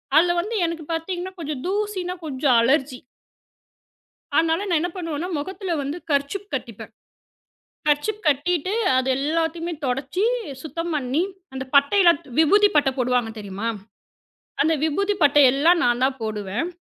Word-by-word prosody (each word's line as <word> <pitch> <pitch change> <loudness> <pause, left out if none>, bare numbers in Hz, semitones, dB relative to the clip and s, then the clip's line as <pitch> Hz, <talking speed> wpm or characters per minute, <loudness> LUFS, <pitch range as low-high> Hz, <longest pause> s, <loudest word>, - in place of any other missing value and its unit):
அதில் 345 +2 +4
வந்து 430 +6 -5
எனக்குப் 330 -1 -5
பார்த்தீங்கன்னா 355 +3 -4
கொஞ்சம் 300 -4 -4
தூசின்னா 385 -2 -2
கொஞ்சம் 270 -3 +1
அலர்ஜி 265 +1 +1 1.4
அதனால 325 0 +3
நான் 335 -3 +2
என்ன 350 +2 -2
பண்ணுவேன்னா, 330 -1 -4
முகத்தில 375 +4 -4
வந்து 280 +3 -4
கர்சீப் 290 +9 -1
கட்டிப்பேன். - - -6 1.0
கர்சீப் 300 +9 +1
கட்டிட்டு 325 +5 +1 0.2
அது 260 0 0
எல்லாவற்றையுமே 330 +4 -1
துடைத்துச் 285 - -1
சுத்தம் 330 +3 -4
பண்ணி, 275 +2 0 0.3
அந்தப் 265 0 -7
பட்டை 285 +8 +5
எல்லாம் 340 -4 +5 0.2
விபூதிப் 410 +5 +4
பட்டை 285 -2 +4
போடுவார்கள் 245 -3 0
தெரியுமா? 205 +2 -5 1.0
அந்த 320 +2 +2
விபூதிப் 395 +5 0
பட்டை 290 0 +6
எல்லாம் 335 +5 +4
நான்தான் 255 +2 +1
போடுவேன். 215 - -3
310 Hz, 130 wpm, -23 LUFS, 270-355 Hz, 1.4 s, பட்டை